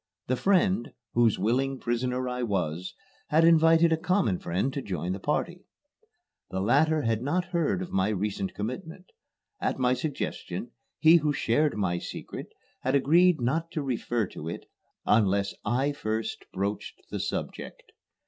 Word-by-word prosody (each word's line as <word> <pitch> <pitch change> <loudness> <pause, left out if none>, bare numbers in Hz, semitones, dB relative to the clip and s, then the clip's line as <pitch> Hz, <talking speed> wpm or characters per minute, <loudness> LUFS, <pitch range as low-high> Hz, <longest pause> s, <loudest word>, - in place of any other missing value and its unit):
The 130 - 0
friend, 185 - +2 0.2
whose 115 -3 +3
willing 130 +7 0
prisoner 125 +1 -1
I 125 0 -3
was, 90 -6 -2 0.3
had 160 +2 +4
invited 165 0 +5
a - - +2
common 180 - +1
friend 95 +11 -1
to 140 - -3
join 90 - -3
the 95 - -3
party. 175 - -2 0.9
The 95 - -3
latter 150 +9 +3
had 115 -1 0
not 170 +7 0
heard 170 +2 +1
of 180 - -9
my 95 +2 +1
recent 100 -1 -2
commitment. 160 - -5 0.5
At - - -1
my 125 -1 +2
suggestion, 125 - -4 0.3
he 160 +2 +7
who 150 -2 +1
shared 145 +1 +1
my 90 -4 0
secret - - -7 0.3
had 130 +2 0
agreed 165 +5 +4
not 155 +8 0
to 155 - -2
refer 120 -3 -1
to 80 - -7
it - - -6 0.4
unless 100 -2 +2
I 130 +6 +1
first 110 -6 -3
broached 100 +2 -3
the - - -3
subject. - - -5
125 Hz, 150 wpm, -28 LUFS, 105-155 Hz, 0.9 s, he